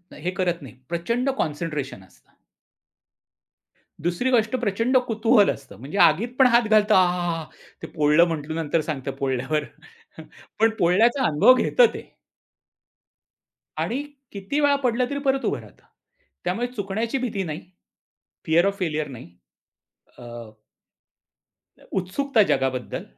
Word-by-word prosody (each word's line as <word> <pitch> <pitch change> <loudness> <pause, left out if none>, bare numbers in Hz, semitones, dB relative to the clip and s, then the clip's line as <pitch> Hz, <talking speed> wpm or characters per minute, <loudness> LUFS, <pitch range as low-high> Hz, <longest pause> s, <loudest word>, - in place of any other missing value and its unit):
हे 170 +5 -4
करत 175 -2 -1
नाही. 130 -6 -11 0.2
प्रचंड 235 +10 -1
कॉन्सन्ट्रेशन 150 - -3
असतं. 95 - -24 1.7
दुसरी 175 +10 -1
गोष्ट 225 -1 +2
प्रचंड 235 +2 +1
कुतूहल 225 -2 +3
असतं. 135 -7 -6
म्हणजे 140 - -7
आगीत 175 +6 +4
पण 260 - +7
हात 235 -1 +3
घालतो 215 -1 +4
आहाहा, 175 -3 +1 0.4
ते - - -6
पोळलं 150 +1 +3
म्हटलं 160 -1 -4
नंतर 165 0 0
सांगतं 140 -3 -4
पोळल्यावर. 135 +3 -1 1.0
पण 225 +1 +5
पोळण्याचा 225 +10 +3
अनुभव 155 +11 +6
घेतं - - +4
ते. - - -10 1.7
आणि 255 +5 -2 0.3
किती 200 +9 -3
वेळा 285 -1 +4
पडला 250 0 +1
तरी 285 0 -3
परत 270 0 +1
उभा - - -1
राहत. - - -18 0.6
त्यामुळे 195 +8 -1
चुकण्याची 225 +1 -3
भीती 235 -7 -2
नाही. 155 -2 -5 0.8
फिअर 165 +2 +3
ऑफ 200 0 0
फेल्यर 155 -4 -2
नाही. 125 -9 -11 0.9
अ, - - -12 1.7
उत्सुकता 215 +7 +1
जगाबद्दल. 130 -2 -2
180 Hz, 120 wpm, -23 LUFS, 155-235 Hz, 1.7 s, पण